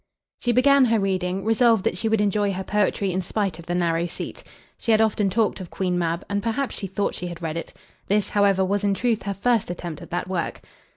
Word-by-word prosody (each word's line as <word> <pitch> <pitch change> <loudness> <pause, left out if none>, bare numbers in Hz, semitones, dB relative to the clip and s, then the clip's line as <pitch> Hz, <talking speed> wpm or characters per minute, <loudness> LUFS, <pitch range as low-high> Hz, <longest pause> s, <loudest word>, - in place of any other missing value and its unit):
She 245 - +1
began 270 +2 +5
her 225 -2 +2
reading, 190 -1 -1
resolved 225 -2 +4
that - - 0
she 220 +5 -1
would 220 -1 +2
enjoy 205 0 +1
her 190 +1 -4
poetry 205 -1 0
in 185 +1 -1
spite 190 -2 -2
of 170 - -11
the 175 - -1
narrow 170 -1 +1
seat. 170 - -7 0.4
She 230 - 0
had 215 - +5
often 215 -2 +2
talked 215 +2 +1
of 180 - -8
"Queen 180 -2 -1
Mab," 170 0 -1
and 200 0 -1
perhaps 235 +5 -1
she 195 - -4
thought 195 +2 -1
she 180 - -5
had 175 -1 -8
read 160 -1 -2
it. 165 - -5 0.4
This, 205 +1 +1
however, 200 -2 +3
was 200 +2 0
in 200 -1 +2
truth 230 0 0
her 200 0 -3
first 230 +1 +1
attempt 175 -3 -5
at - - -10
that 175 +1 -2
work. 185 -2 -3
195 Hz, 235 wpm, -24 LUFS, 180-220 Hz, 0.4 s, began